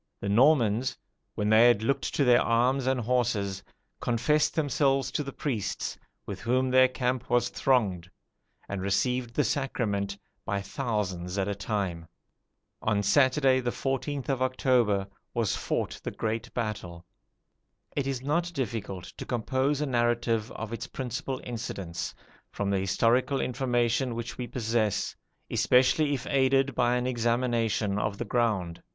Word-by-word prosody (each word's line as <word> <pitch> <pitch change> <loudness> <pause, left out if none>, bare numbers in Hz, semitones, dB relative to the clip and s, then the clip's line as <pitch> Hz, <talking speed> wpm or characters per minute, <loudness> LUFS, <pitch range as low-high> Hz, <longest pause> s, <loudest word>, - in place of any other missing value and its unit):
The 100 - -3
Normans, 120 0 +3 0.4
when 105 - -1
they 110 +2 +7
had 120 -3 +3
looked 140 +4 -1
to 145 - +3
their 125 -2 +5
arms 125 +3 +2
and 130 -1 +2
horses, 110 -5 0 0.4
confessed 125 +6 +1
themselves 140 -2 +1
to - - -1
the 140 -1 -5
priests, 125 -8 -3 0.3
with - - -6
whom 130 +3 +1
their 130 0 +6
camp 125 -1 -2
was 120 0 +2
thronged, 100 -10 +1 0.6
and 100 -1 -4
received 120 +5 0
the 150 - +3
sacrament 105 -9 -1 0.3
by 100 - -1
thousands 100 -6 -3
at 95 0 0
a 100 - 0
time. 100 -5 -3 0.7
On 105 -2 +1
Saturday, 130 +4 +4
the 125 -1 -1
14th 135 +2 -2
of 135 -3 -1
October, 125 -6 +2 0.3
was 115 -5 +1
fought - - -2
the - - -2
great 115 +2 -3
battle. 100 -7 -4 0.9
It 140 -2 -1
is 130 -2 -3
not 170 +5 0
difficult 105 -8 -3
to - - -6
compose 130 +4 0
a - - +1
narrative 120 -3 0
of 110 +1 -6
its 115 - -5
principal 130 +1 -4
incidents, 95 -8 -5 0.3
from 100 -1 -2
the 100 - +2
historical 115 +8 +2
information 125 -1 0
which 120 0 -5
we 125 - -3
possess, 110 -4 -1 0.4
especially 140 +4 +3
if 130 - -6
aided 135 0 +2
by 120 0 +2
an 125 0 0
examination 115 -4 0
of 105 -1 -2
the 120 - -3
ground. 105 -7 0
120 Hz, 145 wpm, -28 LUFS, 105-130 Hz, 0.9 s, they